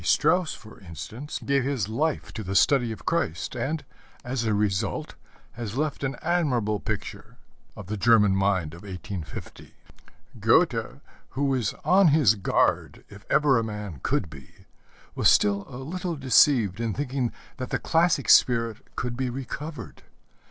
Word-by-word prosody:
Strauss, 180 -3 +2
for 110 - -14
instance, 110 - -7
gave 140 -1 +2
his 130 -7 -1
life 145 +8 -2
to 110 - -5
the 95 +1 -4
study 125 0 +3
of 105 -3 -9
Christ, 130 - -1
and, 145 +5 -3 0.4
as 125 -1 -2
a 110 - +1
result, 100 -2 -1 0.4
has 115 -1 -6
left 150 -1 -2
an 135 -1 -1
admirable 125 -12 +1
picture 110 -1 -6 0.4
of 105 - -9
the 105 +3 -4
German 105 -2 +4
mind 95 -5 0
of 85 - -11
1850. 95 -3 -8 0.6
Goethe, - - +2 0.4
who 140 - +1
was 130 -6 0
on 190 +1 +5
his 145 -8 +5
guard 100 -3 0
if 100 +1 -14
ever 140 -5 +4
a - - -1
man 105 -8 -6
could - - 0
be, 70 -5 -15 0.5
was 105 - +3
still 100 +2 +3
a 125 - -8
little 170 +6 -4
deceived 130 -7 +3
in 115 -3 -2
thinking 130 -3 -2 0.3
that 130 -1 -5
the - - 0
classic 165 -4 +1
spirit 115 -3 +4 0.2
could 120 0 -3
be 130 0 -2
recovered. 135 +2 -7
120 Hz, 150 wpm, -26 LUFS, 100-140 Hz, 0.6 s, on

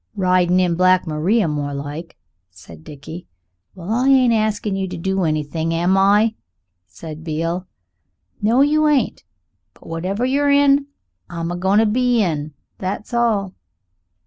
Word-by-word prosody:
"Ridin' 185 -2 +2
in 180 -2 +2
Black 185 +1 +3
Maria, 170 +6 +1
more 145 -2 -3
like," 145 +4 -7 0.3
said 85 -3 -15
Dickie. 150 - -10 0.5
"Well, 185 +2 -7
I 250 +4 +2
ain't 255 -3 +4
askin' 215 -2 -1
you 190 0 -2
to 180 -1 -6
do 190 +1 -1
anything, 160 +1 -2
am 175 +3 +2
I?" 205 +3 +3 0.5
said 155 - -10
Beale. 165 +3 -3 0.7
"No! 230 +5 +3
you 305 +2 +3
ain't. 285 -6 0 0.5
But - - -21
whatever 185 +8 -3
you're 285 +2 +1
in, 280 0 +4 0.4
I'm 170 0 -4
a - - -3
goin' 190 +3 +1
to 225 - +4
be 245 +2 +1
in, 155 -4 -3 0.2
that's 200 +5 -5
all." 215 -5 0
185 Hz, 145 wpm, -20 LUFS, 165-225 Hz, 0.7 s, ain't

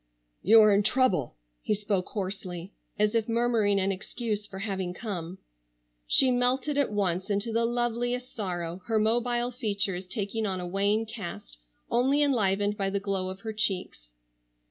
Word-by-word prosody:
"You 225 +3 +7
are 215 -1 +6
in 200 - +4
trouble," 205 - +1 0.3
he 210 - 0
spoke 200 -3 -2
hoarsely, 185 -2 -5 0.2
as 210 +1 +2
if 230 -1 0
murmuring 225 -4 +2
an 195 +1 +1
excuse 210 +2 -4
for 190 - -9
having 190 -3 -3
come. 185 -5 -5 0.7
She 260 -1 +7
melted 250 +4 +1
at 285 -4 +1
once 190 -2 0
into 205 +3 -1
the 230 +1 +2
loveliest 240 +1 -2
sorrow, 175 -4 -4
her 225 -1 +1
mobile 240 +3 +2
features 200 -6 -1
taking 215 +1 -3
on 190 -2 -2
a 180 - -5
wan 200 +4 +1
cast 170 - -8 0.3
only 270 +4 +3
enlivened 205 -6 +1
by 195 -2 0
the 200 +1 -1
glow 195 -2 -2
of 190 +1 -8
her 220 -1 -5
cheeks. 190 - -1
205 Hz, 160 wpm, -27 LUFS, 190-235 Hz, 0.7 s, You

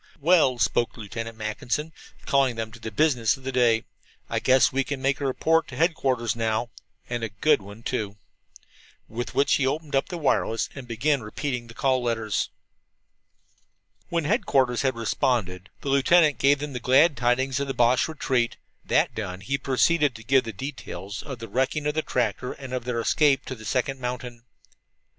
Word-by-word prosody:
"Well," 150 -5 +4
spoke 115 +1 +1
Lieutenant 115 +1 -6
Mackinson, 120 +8 -3 0.3
calling 135 -3 +2
them 110 -1 -4
to 115 - -13
the 110 - -5
business 125 -2 +2
of 135 - -17
the 135 - -3
day, 120 -3 +3 0.5
"I - - +1
guess 130 0 +4
we 135 +1 +2
can 140 0 -4
make 135 +1 0
a 140 - 0
report 165 +5 +2
to - - -9
headquarters 130 - +1
now 115 +1 -1 0.4
and 120 -1 -3
a 115 - -2
good 105 +7 +2
one, 100 +3 -12
too." 105 -6 -3 0.9
With 120 +2 -5
which 140 - +3
he 135 - +2
opened 150 +1 -2
up 135 - +1
the 180 - -4
wireless 130 -6 0
and 135 -3 -9
began 130 +4 +1
repeating 125 +2 -4
the 115 - -13
call 130 -2 +1
letters. 110 -5 -1 1.6
When 170 -1 0
headquarters 140 - +2
had 130 -2 +1
responded, 105 -5 -1
the 140 - -4
lieutenant 145 +3 +4
gave 140 +1 +4
them 145 0 -5
the 125 - -3
glad 140 +6 +4
tidings 125 +2 +1
of 140 - -2
the 135 - -3
Boche 120 +1 +3
retreat. 130 -6 -1 0.3
That - - +2
done, 95 -4 -5
he 135 +9 -1
proceeded 145 +1 +2
to 115 - -10
give 135 +1 +3
the 115 - -4
details 100 -5 -7
of 135 -4 -7
the 115 0 -8
wrecking 135 +5 -1
of 150 - +1
the 155 - 0
tractor 125 -2 -1
and 135 -2 -9
of 125 -2 -3
their 125 -2 -1
escape 135 +3 +2
to - - -5
the 110 -3 -11
second 135 +3 -1
mountain. 125 -1 -5
130 Hz, 185 wpm, -25 LUFS, 115-140 Hz, 1.6 s, Well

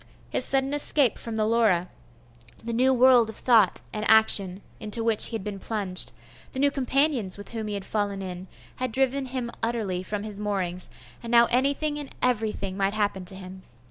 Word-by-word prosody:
His - - +4
sudden 270 +1 +1
escape 285 -3 +3
from 230 -1 -6
the 215 -1 0
Laura, 215 -6 +2 0.8
the 230 0 -4
new 255 +3 +3
world 250 -2 +5
of 220 - -8
thought 225 -7 +3
and 215 - -3
action 200 -3 +3 0.2
into 220 +1 -2
which 225 -2 +5
he 230 - -4
had 220 - -5
been 205 -1 -6
plunged, 195 -4 -2 0.4
the 260 - -5
new 285 +1 +3
companions 270 -7 0
with 205 - -10
whom 225 -2 -5
he 210 - -4
had 200 - -6
fallen 200 -2 -3
in, 185 0 -7 0.3
had 255 -2 -3
driven 265 +2 0
him 250 -2 -4
utterly 220 -6 -2
from 205 +2 -5
his 210 -2 -7
moorings, 185 -4 -3 0.3
and 235 - -8
now 235 0 +6
anything 285 +4 0
and 290 - -9
everything 215 -5 -1
might 195 +1 -1
happen 205 -3 -2
to 190 - -1
him. 190 0 -10
220 Hz, 190 wpm, -25 LUFS, 200-250 Hz, 0.8 s, now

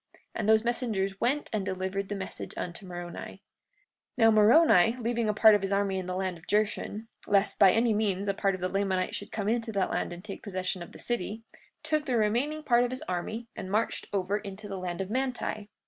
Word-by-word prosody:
And 215 -1 -1
those 220 0 +5
messengers 215 -5 -1
went 280 +5 +1
and 210 -2 0
delivered 190 +1 -3
the 205 - -2
message 190 -1 -6
unto 180 +3 -5
Moroni. 175 -1 -7
43:25 - - -34 0.8
Now 225 -2 +6
Moroni, 220 - +6
leaving 235 -1 0
a - - +2
part 220 0 +7
of 205 - +3
his 195 0 -2
army 200 -1 +1
in 185 - -6
the 180 - -3
land 185 -2 -2
of 165 - -20
Jershon, 210 +1 -1 0.2
lest 200 0 +2
by 195 -2 +8
any 225 +2 +3
means 205 -2 0
a 200 - +2
part 195 -1 0
of 185 - -9
the 185 - +1
Lamanites 190 -1 -1
should 205 - -6
come 205 -2 -3
into 230 0 0
that 195 -2 0
land - - -1
and 175 +3 -9
take 200 - -7
possession 185 -2 -3
of 170 - -8
the - - -10
city, 225 -1 -3 0.4
took 305 -1 0
the 250 -2 +1
remaining 245 +9 0
part 240 -3 +4
of 245 - 0
his 255 +1 -5
army 200 +6 -4
and 185 - -6
marched 215 +3 -1
over 200 +1 0
into 205 0 -8
the 195 -2 -5
land 180 0 -3
of 195 +1 -5
Manti. 245 -4 -2
205 Hz, 225 wpm, -29 LUFS, 190-225 Hz, 0.8 s, by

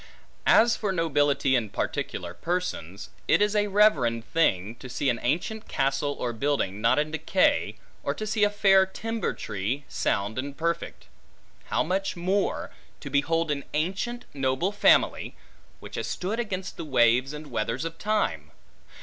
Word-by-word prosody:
As 230 +1 +6
for 205 -3 -2
nobility 145 -5 +2
in 115 -4 0
particular 90 -2 -3
persons; 100 - -4 0.2
it - - +4
is 210 +1 +2
a 210 0 +2
reverend 145 - +3
thing, 110 - +1
to 130 - -10
see 125 +2 +1
an 115 - -3
ancient 180 - -2
castle 135 +1 0
or 120 -1 -2
building, 115 -6 -1
not 115 +4 +3
in 150 +1 0
decay; 160 +4 +1 0.3
or - - -2
to 215 - -4
see 215 0 0
a 205 - +5
fair 195 -2 +4
timber 225 +3 -3
tree, 110 +8 -3
sound 100 +4 -1
and 140 +1 -5
perfect. 170 +1 -3 0.6
How - - +1
much 190 +4 -1
more, 190 +3 -1 0.3
to 140 - -8
behold 165 +3 +1
an 140 -1 -2
ancient 195 +10 -2
noble 135 +6 0
family, 205 - +3 0.4
which - - -11
has - - -3
stood 205 +6 -3
against 190 -5 -4
the - - -4
waves 130 -2 +3
and 150 -1 -9
weathers 115 +5 -2
of 165 0 -6
time! 215 0 -1
150 Hz, 160 wpm, -26 LUFS, 130-195 Hz, 0.6 s, As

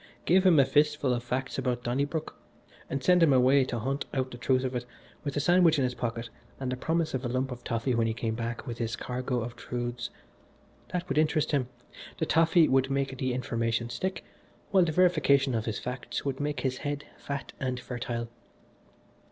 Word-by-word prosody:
Give 185 +2 +5
him 165 -5 +6
a 135 - +6
fistful 145 -1 +2
of 120 -1 -2
facts 130 +2 -2
about 120 -1 -1
Donnybrook, 140 +6 -2 0.5
and 135 -1 -3
send 180 +2 +5
him 165 -3 +6
away 130 +1 +5
to 125 - -3
hunt 135 +6 -2
out 130 -1 -1
the 120 - -7
truth 130 +1 +2
of 130 0 -2
it, 125 - -1 0.4
with 145 -1 -3
a - - +3
sandwich 175 +1 +5
in 135 - +2
his 125 0 0
pocket 115 -1 -3 0.3
and 130 -1 -2
the - - 0
promise 160 +4 -1
of 130 0 -2
a - - -1
lump 130 +2 -1
of 125 0 -7
toffee 115 +2 -1
when 115 -1 +2
he 110 - 0
came 110 -1 -2
back 115 +2 -4
with 120 -3 -6
his 115 -1 -1
cargo 125 0 -2
of 115 +1 -5
truths 120 0 -4 0.8
that 180 -1 -2
would 150 - +1
interest 155 0 +2
him, 135 -4 +1 0.5
the - - 0
toffee 165 0 +4
would 135 0 +3
make 135 -1 -1
the 130 -1 0
information 115 -1 -1
stick, 185 +11 -3 0.5
while 190 -2 +6
the 160 - 0
verification 150 -6 +3
of 110 -1 -1
his 110 - -2
facts 125 +2 -5
would 135 -1 -2
make 145 -3 -2
his 130 -1 -1
head 145 0 -3
fat 140 -1 -5
and 130 -2 -2
fertile. 120 -2 -4
130 Hz, 205 wpm, -29 LUFS, 120-145 Hz, 0.8 s, him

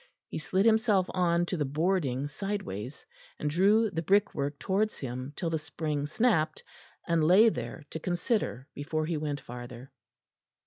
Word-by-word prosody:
He - - -4
slid 185 +7 +1
himself 220 -4 +4
on 175 -2 +2
to 180 - -3
the 150 - +1
boarding 145 -2 0
sideways, 145 - -5 0.3
and 150 - -2
drew 205 +6 +4
the 165 - -2
brickwork 160 -6 +1
towards 205 +6 0
him 130 +1 -5
till 165 -2 -2
the 160 - 0
spring 150 -1 -3
snapped, 160 -2 +1 0.4
and 170 -2 +2
lay 190 +8 +7
there 165 - -5
to 160 - -4
consider 175 - -1
before 155 +2 -2
he 165 +1 -1
went 150 -1 -3
farther. 120 +1 -9
160 Hz, 150 wpm, -29 LUFS, 145-195 Hz, 0.4 s, lay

